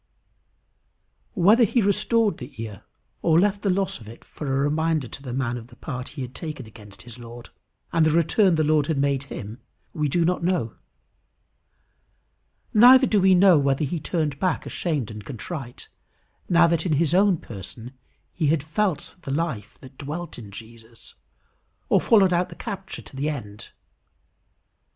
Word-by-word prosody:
Whether 210 +6 +5
he 235 +3 +2
restored 215 +1 +2
the 125 -1 -10
ear, 110 -3 -7 0.4
or 165 0 +4
left 200 +1 +1
the 200 - 0
loss 190 -3 0
of 110 - -13
it 115 - -13
for 150 - -8
a 135 - +1
reminder 155 0 0
to 135 - -10
the 130 -3 -7
man 125 -1 -2
of 115 -1 -10
the 120 - -17
part 130 -1 -6
he 135 - -3
had 125 0 -8
taken 150 -6 -6
against 105 -3 -14
his 120 0 -11
Lord, 120 0 -11 0.4
and 165 -1 +3
the 155 - +4
return 170 +4 +3
the 155 - +2
Lord 150 -1 +2
had 160 - -1
made 140 -1 +1
him, 105 +4 -8 0.3
we 150 -2 -1
do 170 +4 +1
not 180 0 0
know. 170 -11 0 2.0
Neither 255 +4 +8
do 210 -5 +2
we 190 0 +5
know 180 -3 +6
whether 140 +1 +1
he 160 +4 -3
turned 150 -3 -2
back 185 -4 0
ashamed 145 - -3
and 105 -1 -8
contrite, 135 - -7 0.6
now 170 -1 +6
that 165 -1 +1
in 175 - 0
his 155 +2 +1
own 190 -1 +4
person 115 - -9 0.4
he 160 -4 0
had 150 -1 +1
felt 170 +2 -2
the 140 - -8
life 140 -7 -3
that 130 0 -15
dwelt 155 +2 -6
in 105 -4 -10
Jesus, 115 +2 -13 0.8
or - - +4
followed 195 -5 +4
out 175 +1 +1
the - - -11
capture 195 -4 -7
to - - -14
the 140 +3 -1
end. 105 -9 -7
150 Hz, 175 wpm, -24 LUFS, 125-180 Hz, 2.0 s, Neither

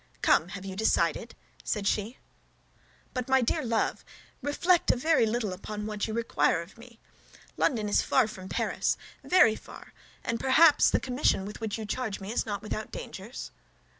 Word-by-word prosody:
"Come! 160 - +4
Have 195 - -10
you 190 -1 -6
decided?" 220 +3 +1 0.3
said 205 -2 -2
she. 215 +5 -1 1.0
"But, 255 -1 -3
my 265 -1 +4
dear 230 - 0
love, 230 -2 -1 0.4
reflect 340 +5 +2
a - - +5
little 240 - +1
upon 210 +3 -6
what 210 0 -3
you 220 - -4
require 230 -7 +1
of 170 - -17
me. 235 0 -15 0.6
London 220 -5 +1
is 205 - +3
far 255 -4 +3
from 190 -3 -9
Paris, - - 0 0.3
very 360 -12 +5
far, - - -13 0.3
and 230 0 -2
perhaps 295 +5 +6
the - - +2
commission 250 -6 +1
with 210 +3 -8
which 220 -1 -3
you 220 - -5
charge 220 -1 -3
me 195 +1 -6
is 235 - -1
not 205 -1 -4
without 215 0 -4
dangers?" 210 +6 -8
220 Hz, 165 wpm, -28 LUFS, 205-255 Hz, 1.0 s, perhaps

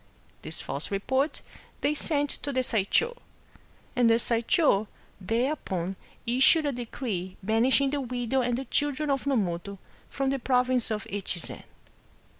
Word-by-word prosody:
This 155 +1 -4
false 140 - -1
report 260 +9 0 0.4
they 290 - +2
sent 290 -1 0
to 285 - -3
the 260 -1 +1
Saisho,^ 250 - +2 0.8
and 245 -2 +4
the 230 - +6
Saish5 230 - +2 0.3
thereupon 195 - -1 0.3
issued 265 +6 +5
a 290 - +1
decree 225 -7 -4
banishing 250 +6 +3
the 285 -1 -1
widow 250 0 -1
and 245 -1 0
the 270 - -4
children 290 +3 0
of 275 0 -1
Nomoto 200 -7 -1 0.3
from 270 -1 -1
the 275 - -1
province 250 -1 +2
of 215 -2 -2
Echi 195 -2 -4
zen. 170 - -6
245 Hz, 140 wpm, -28 LUFS, 210-275 Hz, 0.8 s, the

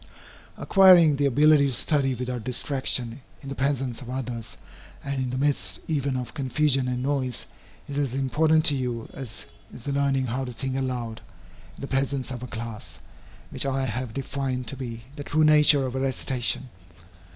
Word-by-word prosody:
Acquiring 180 -6 +6
the 145 0 +3
ability 145 +2 +5
to 135 - -2
study 135 0 +1
without 125 -1 -4
distraction 125 -1 -2 0.2
in 135 - -7
the - - -3
presence 135 -3 -1
of 125 - -9
others 120 -4 -5 0.5
and 140 -1 -2
in 130 - -2
the 130 - -3
midst 145 +1 0
even 140 -4 0
of 125 -2 -5
confusion 135 -1 +1
and 125 0 -2
noise, 130 -3 -1 0.4
is 145 0 -3
as 140 -4 -1
important 155 +4 +2
to 145 - +7
you 125 -3 -3
as 130 -5 -7 0.3
is 120 - -11
the 140 - -2
learning 140 -1 +1
how 125 +2 -2
to 125 -1 -6
think 130 +2 -3
aloud, 125 -4 -3 0.6
in - - -11
the 140 - -4
presence 135 -1 -1
of 125 -2 -5
a 125 - -6
class, 115 -2 -7 0.5
which - - -1
I 135 0 0
have 125 0 -3
defined 130 0 -3
to - - -4
be 115 -3 -6
the 145 - -6
true 155 +2 +1
nature 150 -2 +6
of 125 - -4
a 130 - -2
recitation. 130 -1 -1
135 Hz, 180 wpm, -26 LUFS, 125-140 Hz, 0.6 s, to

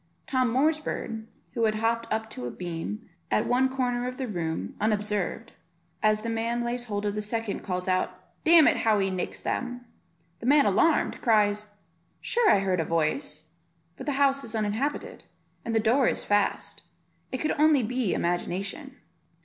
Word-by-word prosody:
Tom 255 -2 +1
Moor's 305 +6 +3
bird, 225 -7 -5 0.2
who 230 -2 0
had 215 -1 +1
hopped 230 +1 -1
up 220 0 -1
to 125 -1 -5
a - - -3
beam 175 - -5 0.2
at - - +2
one 255 +2 +3
corner 250 -2 -1
of 255 0 -5
the 265 - -2
room 170 -7 -3
unobserved, 210 -1 -1 0.5
as 215 0 +2
the - - -3
man 230 +1 -1
lays 240 +1 -2
hold 205 -2 -3
of 205 - 0
the 210 - -2
second, 220 0 -2
calls 180 -1 -3
out, 185 0 0 0.2
"Damn 325 -1 +7
it, - - +4
how 220 -2 +3
he 195 -1 +1
nicks 185 -1 -3
them." 245 -1 -3 0.5
The 235 - -5
man 285 +1 +6
alarmed, 290 +11 +2
cries, 210 -2 +2 0.5
"Sure 475 -2 +2
I 195 - +5
heard 185 -2 0
a - - +2
voice, 155 -1 -1 0.5
but 265 - -9
the 290 - +1
house 275 0 +2
is 230 0 -6
uninhabited, 220 +7 -2 0.4
and 230 -1 -2
the - - +5
door 240 +4 +3
is - - 0
fast; 205 -1 0 0.5
it 260 - -1
could 305 - -1
only 300 -4 +5
be 250 -2 0
imagination." 195 - -2
225 Hz, 175 wpm, -27 LUFS, 205-255 Hz, 0.5 s, Damn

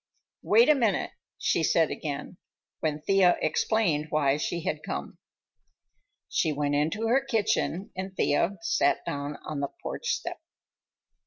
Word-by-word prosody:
"Wait 230 +4 +5
a 305 - +7
minute," 230 -9 +1 0.3
she - - +1
said - - +3
again, - - -5 0.4
when 155 -1 -1
Thea 190 -2 +4
explained 155 -2 +1
why 145 -3 +2
she 170 +2 -2
had 190 - -2
come. - - -6 1.1
She 160 - +1
went 145 0 -1
into 160 +10 0
her 255 +4 +3
kitchen 220 -6 0
and 190 +1 -6
Thea 180 +7 +1
sat 170 - +1
down 145 +1 -4
on 150 -2 -4
the 140 -1 -2
porch 485 - -5
step. - - -2
175 Hz, 140 wpm, -27 LUFS, 150-220 Hz, 1.1 s, a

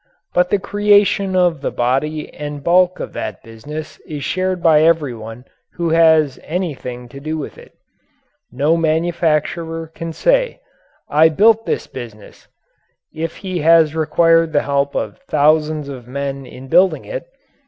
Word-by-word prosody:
But 180 0 +2
the 205 - +2
creation 205 -1 +2
of 175 -5 +2
the - - -1
body 135 +5 -2
and 145 -1 -7
bulk 180 +2 +3
of - - -6
that - - -6
business 145 +8 -9
is 150 -3 -6
shared 185 -1 -2
by 155 -3 +5
everyone 125 -8 0 0.3
who 170 -1 -2
has 160 -4 +4
anything 140 -8 -5
to 140 - -10
do 155 +3 -4
with 150 - -6
it. - - -16 0.8
No 145 +6 +1
manufacturer 165 0 -1
can 165 -1 -6
say: - - +1 0.5
"I 155 +2 +5
built 220 +7 +3
this - - -1
business" 115 -5 -11 0.7
if 160 +1 -5
he 185 -2 -2
has 160 -1 +4
required 165 +1 +2
the 145 - +2
help 140 0 -1
of 105 -2 -3
thousands 150 0 +2
of 130 -4 -9
men 135 0 -5
in 130 +1 -11
building 185 +7 +3
it. - - -6
155 Hz, 145 wpm, -18 LUFS, 140-175 Hz, 0.8 s, by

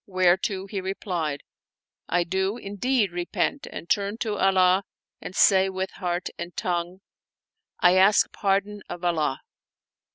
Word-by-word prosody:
" - - -68
whereto 185 +1 +2
he 195 -1 -4
replied, 175 -6 -3 0.3
" - - -48
I 175 0 +2
do 190 +5 -1
indeed 205 0 0
repent 175 +10 -2
and 170 - -8
turn 200 +3 0
to 215 -3 -1
Allah 190 -1 +3 0.4
and 185 - -8
say 190 -1 +5
with 190 0 -3
heart 175 -1 -3
and 170 +1 -7
tongue: 175 +1 -2 0.8
I 180 +1 +5
ask 195 +2 +5
pardon 200 +1 -1
of 175 - -7
Allah." 155 -6 0
190 Hz, 140 wpm, -25 LUFS, 175-200 Hz, 0.8 s, say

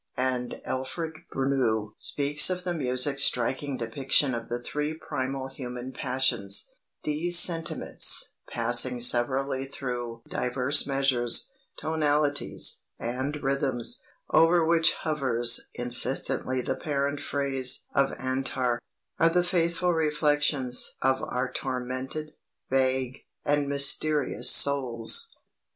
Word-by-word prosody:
And 125 -1 -2
Alfred 155 +5 -4 0.2
Bruneau 125 -6 0
speaks 145 +2 +2
of 180 -1 -3
the 180 -1 -2
music's 140 -1 +1
striking 130 +2 0
depiction 130 +3 0
of 115 -1 -5
the 120 - -2
three 150 +5 -4
primal 130 -3 -4
human 125 -1 -7
passions: 125 -8 -1 0.4
"These 165 +4 +4
sentiments, 165 -2 +2 0.2
passing 120 +1 +2
severally 130 +3 +1
through 120 -4 -6
diverse 130 +4 +2
measures, 135 - +1 0.3
tonalities, 150 -2 0 0.2
and 130 +5 -3
rhythms, 135 -3 -1 0.3
over 165 0 +4
which 165 0 +3
hovers 125 -6 0
insistently 125 +1 -1
the - - -1
parent 140 -1 -2
phrase 135 -3 0
of 140 0 +2
Antar, 130 -2 -2 0.4
are 165 - +5
the 180 +1 +2
faithful 175 0 0
reflections 145 -4 0
of 130 0 +2
our 125 +1 -3
tormented, 130 +3 -4 0.4
vague, 130 -1 0 0.3
and 145 -1 +1
mysterious 140 +1 +3
souls." 125 -5 +4
135 Hz, 105 wpm, -27 LUFS, 125-150 Hz, 0.4 s, are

